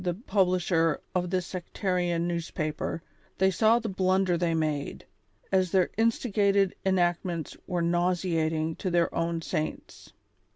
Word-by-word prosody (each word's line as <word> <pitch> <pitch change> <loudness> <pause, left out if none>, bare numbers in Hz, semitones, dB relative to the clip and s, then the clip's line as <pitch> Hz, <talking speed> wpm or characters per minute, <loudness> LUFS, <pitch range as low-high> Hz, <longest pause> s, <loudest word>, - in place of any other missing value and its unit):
e 175 -1 0
pub 195 -2 +3
lisher 170 -3 +1
of 180 -1 0
this 185 -1 -1
sectarian 180 -2 -1
newspaper, 165 -1 -3 0.3
they 190 0 +3
saw 220 +5 +4
the 230 -1 -3
blunder 185 -1 +1
they 170 -1 0
made, 155 -3 -2 0.5
as 185 -1 +3
their 185 0 +2
instigated 205 -4 +2
enactments 175 -3 0
were 180 -3 -1
nauseating 170 -2 0
to 185 - -3
their 170 -1 +1
own 165 0 -1
saints. 155 -2 -5
175 Hz, 130 wpm, -28 LUFS, 165-190 Hz, 0.5 s, saw